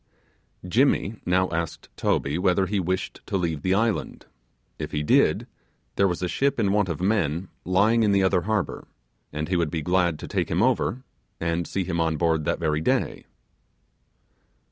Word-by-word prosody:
Jimmy 115 Hz, 0 st, +2 dB
now 95 Hz, +1 st, +3 dB
asked 85 Hz, -1 st, -4 dB
Toby 70 Hz, +5 st, 0 dB
whether 95 Hz, +1 st, +2 dB
he 100 Hz, +1 st, -1 dB
wished 95 Hz, +1 st, -3 dB
to 100 Hz, -, 0 dB
leave 80 Hz, -5 st, -2 dB
the 95 Hz, +4 st, +1 dB
island 115 Hz, +1 st, -1 dB, 0.5 s
if -, -, -5 dB
he 75 Hz, -, -1 dB
did, -, -, +3 dB, 0.5 s
there 100 Hz, -, +3 dB
was 90 Hz, 0 st, -2 dB
a -, -, +1 dB
ship 140 Hz, +7 st, 0 dB
in 100 Hz, -3 st, +2 dB
want 100 Hz, -2 st, +2 dB
of 85 Hz, -, -3 dB
men 95 Hz, -4 st, 0 dB, 0.2 s
lying 105 Hz, +6 st, +3 dB
in 105 Hz, -2 st, +3 dB
the 100 Hz, -1 st, +3 dB
other 95 Hz, -1 st, +3 dB
harbour, 105 Hz, +1 st, -2 dB, 0.4 s
and 75 Hz, +1 st, -3 dB
he 90 Hz, -, 0 dB
would 85 Hz, -3 st, +1 dB
be 80 Hz, 0 st, -3 dB
glad 90 Hz, -1 st, +1 dB
to -, -, -8 dB
take -, -, -1 dB
him 90 Hz, +6 st, +1 dB
over, 130 Hz, 0 st, +1 dB, 0.4 s
and 85 Hz, 0 st, -1 dB
see 95 Hz, -, -2 dB
him 85 Hz, -2 st, -2 dB
on 80 Hz, -1 st, +1 dB
board 80 Hz, -1 st, +1 dB
that -, -, 0 dB
very 75 Hz, -2 st, 0 dB
day. -, -, -1 dB
90 Hz, 180 wpm, -25 LUFS, 85-100 Hz, 0.5 s, now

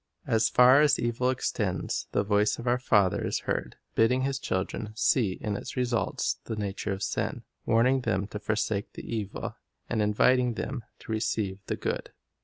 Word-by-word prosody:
As 115 Hz, 0 st, +2 dB
far 125 Hz, +3 st, +7 dB
as 145 Hz, -2 st, +4 dB
evil 120 Hz, +2 st, 0 dB
extends, 105 Hz, -7 st, -1 dB
the -, -, +1 dB
voice 105 Hz, +1 st, +2 dB
of 120 Hz, -, -7 dB
our 125 Hz, +1 st, +2 dB
Father 105 Hz, -7 st, +3 dB
is -, -, -1 dB
heard, -, -, -2 dB, 0.2 s
bidding 125 Hz, +3 st, +3 dB
His 135 Hz, 0 st, -1 dB
children 105 Hz, 0 st, -3 dB
see 110 Hz, -3 st, +2 dB
in 105 Hz, -1 st, -2 dB
its -, -, -6 dB
results 120 Hz, -2 st, 0 dB
the 110 Hz, -, -3 dB
nature 100 Hz, 0 st, -3 dB
of 95 Hz, +1 st, -3 dB
sin, -, -, -2 dB, 0.2 s
warning 125 Hz, +4 st, +4 dB
them 95 Hz, -4 st, 0 dB
to 105 Hz, -, -5 dB
forsake 105 Hz, -1 st, -1 dB
the -, -, -8 dB
evil, 105 Hz, -4 st, -4 dB, 0.3 s
and 110 Hz, -2 st, +1 dB
inviting 120 Hz, +4 st, +3 dB
them 130 Hz, +1 st, -4 dB, 0.2 s
to -, -, -8 dB
receive 110 Hz, -3 st, -1 dB
the -, -, -1 dB
good. -, -, -3 dB
110 Hz, 175 wpm, -28 LUFS, 105-125 Hz, 0.3 s, far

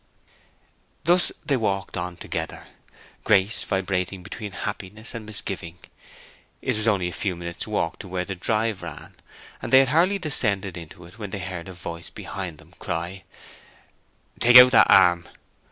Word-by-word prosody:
Thus 175 Hz, +2 st, +3 dB
they 140 Hz, -3 st, +2 dB
walked 100 Hz, -4 st, -2 dB
on 90 Hz, -1 st, -4 dB
together. -, -, -5 dB, 0.6 s
Grace 100 Hz, +1 st, +3 dB
vibrating 95 Hz, -1 st, -2 dB
between 105 Hz, +2 st, -7 dB
happiness 105 Hz, +3 st, -5 dB
and 115 Hz, -3 st, -7 dB
misgiving. 95 Hz, -5 st, -5 dB, 0.8 s
It -, -, -1 dB
was 110 Hz, +1 st, -1 dB
only 100 Hz, -5 st, +2 dB
a -, -, -4 dB
few 95 Hz, +2 st, -2 dB
minutes' 85 Hz, +2 st, -6 dB
walk 105 Hz, -6 st, -2 dB
to -, -, -9 dB
where 90 Hz, 0 st, -3 dB
the 95 Hz, -, -4 dB
drive 110 Hz, +2 st, -1 dB
ran, 80 Hz, -4 st, -9 dB, 0.5 s
and -, -, -5 dB
they 130 Hz, -, +8 dB
had 135 Hz, -, +1 dB
hardly 175 Hz, +7 st, +3 dB
descended 105 Hz, -, +1 dB
into 85 Hz, 0 st, -10 dB
it 90 Hz, +7 st, -16 dB
when 105 Hz, -2 st, -5 dB
they 100 Hz, -, -5 dB
heard 90 Hz, -2 st, -6 dB
a 95 Hz, -, -8 dB
voice 85 Hz, -1 st, -7 dB
behind 90 Hz, -5 st, -6 dB
them -, -, -19 dB
cry, 85 Hz, +3 st, -4 dB, 1.1 s
"Take 120 Hz, +1 st, +8 dB
out 125 Hz, 0 st, +10 dB
that -, -, +6 dB
arm!" 90 Hz, -3 st, +5 dB
95 Hz, 160 wpm, -24 LUFS, 90-110 Hz, 1.1 s, out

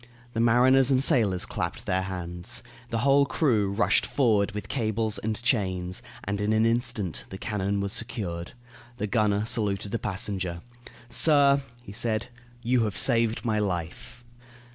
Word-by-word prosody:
The 115 Hz, -, -2 dB
mariners 125 Hz, +3 st, +5 dB
and 135 Hz, -1 st, +3 dB
sailors 110 Hz, -, +3 dB
clapped -, -, -4 dB
their 95 Hz, 0 st, 0 dB
hands. 95 Hz, +5 st, -4 dB, 0.3 s
The 115 Hz, -, -2 dB
whole 140 Hz, 0 st, +4 dB
crew 120 Hz, -8 st, +1 dB
rushed 100 Hz, 0 st, +2 dB
forward 110 Hz, -7 st, +1 dB
with 105 Hz, -, -6 dB
cables 110 Hz, -3 st, -1 dB
and 110 Hz, 0 st, -3 dB
chains, 95 Hz, -7 st, -1 dB, 0.2 s
and 100 Hz, +1 st, -3 dB
in 105 Hz, +1 st, +1 dB
an 110 Hz, +1 st, +3 dB
instant 115 Hz, -6 st, -1 dB
the 95 Hz, -, -7 dB
cannon 100 Hz, -1 st, -2 dB
was 100 Hz, +1 st, -2 dB
secured. 95 Hz, -7 st, -4 dB, 0.4 s
The 105 Hz, -, -2 dB
gunner 105 Hz, -1 st, +1 dB
saluted 105 Hz, -4 st, -1 dB
the 115 Hz, -, -1 dB
passenger. 95 Hz, -4 st, -3 dB, 0.5 s
"Sir," 140 Hz, -3 st, +5 dB, 0.2 s
he 105 Hz, -, -10 dB
said, 110 Hz, +2 st, -2 dB, 0.3 s
"you 120 Hz, 0 st, +2 dB
have 105 Hz, -1 st, -3 dB
saved 115 Hz, -2 st, +2 dB
my 110 Hz, -2 st, +1 dB
life." 105 Hz, +6 st, -4 dB
110 Hz, 150 wpm, -26 LUFS, 100-120 Hz, 0.5 s, mariners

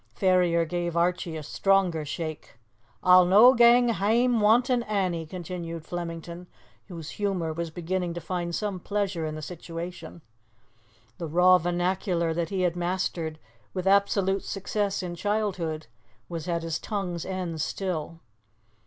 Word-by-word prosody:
Ferrier 180 Hz, -3 st, +3 dB
gave 175 Hz, 0 st, -2 dB
Archie 175 Hz, -1 st, 0 dB
a 155 Hz, -, -6 dB
stronger 185 Hz, 0 st, +1 dB
shake. 155 Hz, -4 st, -6 dB, 0.5 s
"A'll 180 Hz, 0 st, +8 dB
no 210 Hz, +8 st, +7 dB
gang 240 Hz, 0 st, +6 dB
hame 230 Hz, +3 st, +2 dB
wantin' 240 Hz, +4 st, +4 dB
Annie!" 185 Hz, -7 st, -1 dB
continued 170 Hz, -1 st, -6 dB
Flemington, 170 Hz, 0 st, -6 dB, 0.4 s
whose 165 Hz, -5 st, -8 dB
humour 180 Hz, -6 st, -1 dB
was 170 Hz, +1 st, -4 dB
beginning 175 Hz, +1 st, -3 dB
to -, -, -3 dB
find 175 Hz, 0 st, -3 dB
some 205 Hz, -3 st, -2 dB
pleasure 195 Hz, -4 st, -2 dB
in 155 Hz, -, -5 dB
the 155 Hz, -, -7 dB
situation. 170 Hz, 0 st, -7 dB, 1.0 s
The 170 Hz, -, -3 dB
raw 180 Hz, +3 st, +5 dB
vernacular 175 Hz, -1 st, 0 dB
that 170 Hz, 0 st, -2 dB
he 195 Hz, -2 st, -1 dB
had 180 Hz, -1 st, +1 dB
mastered 175 Hz, -3 st, -2 dB, 0.4 s
with 185 Hz, -1 st, -3 dB
absolute 195 Hz, 0 st, +2 dB
success 200 Hz, 0 st, -2 dB
in 175 Hz, -1 st, -4 dB
childhood 180 Hz, -5 st, -2 dB, 0.4 s
was 165 Hz, -2 st, -6 dB
at 170 Hz, -1 st, -1 dB
his 165 Hz, -1 st, -2 dB
tongue's 185 Hz, -6 st, -3 dB
end 180 Hz, -4 st, -4 dB
still. 165 Hz, -2 st, -3 dB
180 Hz, 135 wpm, -27 LUFS, 165-195 Hz, 1.0 s, A'll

